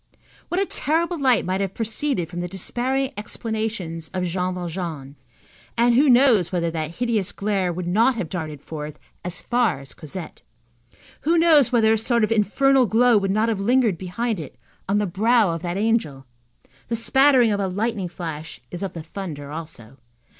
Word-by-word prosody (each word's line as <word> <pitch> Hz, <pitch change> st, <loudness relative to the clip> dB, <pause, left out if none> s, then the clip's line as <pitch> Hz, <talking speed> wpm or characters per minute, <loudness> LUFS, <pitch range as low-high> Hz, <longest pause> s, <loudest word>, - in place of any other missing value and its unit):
What 355 Hz, -, 0 dB
a 395 Hz, -, +2 dB
terrible 335 Hz, +1 st, 0 dB
light 255 Hz, -4 st, +3 dB
might 185 Hz, +1 st, -1 dB
have 195 Hz, -1 st, -3 dB
proceeded 225 Hz, -, -1 dB
from 175 Hz, +2 st, -7 dB
the 175 Hz, -, -2 dB
despairing 255 Hz, +9 st, -1 dB
explanations 210 Hz, -6 st, -4 dB
of 185 Hz, -, -1 dB
Jean 180 Hz, +1 st, -2 dB
Valjean, 165 Hz, -6 st, -5 dB, 0.6 s
and 240 Hz, +1 st, +4 dB
who 275 Hz, +4 st, +4 dB
knows 240 Hz, -, +5 dB
whether 170 Hz, -2 st, 0 dB
that 160 Hz, 0 st, -4 dB
hideous 230 Hz, -4 st, 0 dB
glare 195 Hz, -3 st, -1 dB
would 175 Hz, +1 st, -4 dB
not 225 Hz, +9 st, +3 dB
have 205 Hz, -7 st, -3 dB
darted 155 Hz, -4 st, -6 dB
forth 150 Hz, -1 st, -6 dB, 0.3 s
as 180 Hz, 0 st, -3 dB
far 235 Hz, -, +1 dB
as 135 Hz, -1 st, -11 dB
Cosette? 165 Hz, +2 st, -9 dB, 0.8 s
Who 330 Hz, +4 st, +2 dB
knows 320 Hz, -6 st, +5 dB
whether 225 Hz, -2 st, +4 dB
a 220 Hz, -, +1 dB
sort 235 Hz, +1 st, +2 dB
of 215 Hz, -, +1 dB
infernal 255 Hz, +5 st, +3 dB
glow 240 Hz, +3 st, +4 dB
would 195 Hz, -1 st, -2 dB
not 215 Hz, +3 st, +2 dB
have 220 Hz, -4 st, -1 dB
lingered 225 Hz, -4 st, +2 dB
behind 205 Hz, +3 st, -2 dB
it 155 Hz, -, -9 dB, 0.3 s
on 200 Hz, -, +2 dB
the 210 Hz, -, +1 dB
brow 215 Hz, +2 st, +2 dB
of 165 Hz, -1 st, -4 dB
that 175 Hz, +1 st, -3 dB
angel? 200 Hz, -11 st, 0 dB, 0.6 s
The 230 Hz, -, -1 dB
spattering 260 Hz, 0 st, +4 dB
of 200 Hz, -, 0 dB
a 195 Hz, -, 0 dB
lightning 205 Hz, 0 st, -2 dB
flash 165 Hz, -3 st, -7 dB
is 175 Hz, -, -6 dB
of 195 Hz, -3 st, -4 dB
the 165 Hz, -, -7 dB
thunder 155 Hz, -5 st, -7 dB
also. 145 Hz, -6 st, -8 dB
200 Hz, 180 wpm, -23 LUFS, 170-235 Hz, 0.8 s, knows